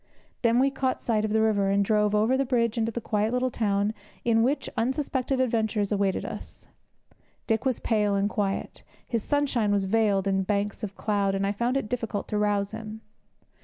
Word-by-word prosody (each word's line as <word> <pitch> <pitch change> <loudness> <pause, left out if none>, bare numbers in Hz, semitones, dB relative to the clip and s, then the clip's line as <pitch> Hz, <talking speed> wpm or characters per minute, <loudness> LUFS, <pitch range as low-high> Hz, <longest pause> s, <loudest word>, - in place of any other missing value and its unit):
Then 235 -1 +3
we 270 +2 +3
caught 265 -1 -1
sight 215 -2 0
of 215 - -2
the 220 0 +3
river, 205 -3 +2
and 200 0 +2
drove 210 0 +2
over 220 +5 +3
the 270 - +2
bridge 235 -3 +1
into 225 -1 0
the 235 - -3
quiet 215 -1 0
little 250 +1 0
town 205 -2 0 0.3
in 225 -1 +4
which 265 +6 +1
such - - -8
unsuspected 265 +1 -1
adventures 220 -4 0
awaited 200 -2 0
us. - - -8 0.8
Dick 225 +2 0
was 260 -3 +1
pale 210 -3 +1
and 200 +1 +2
quiet; 200 -1 -2 0.3
his 230 -2 -1
sunshine 265 -6 +1
was 200 -1 +2
veiled 200 -1 +2
in 195 0 +2
banks 200 +1 -1
of 200 -2 -5
cloud, 200 -2 0
and 195 0 0
I 200 - +1
found 235 +5 0
it 270 - -2
difficult 225 -3 -3
to 210 - 0
rouse 205 -1 +1
him. 220 0 -7
220 Hz, 200 wpm, -26 LUFS, 205-240 Hz, 0.8 s, in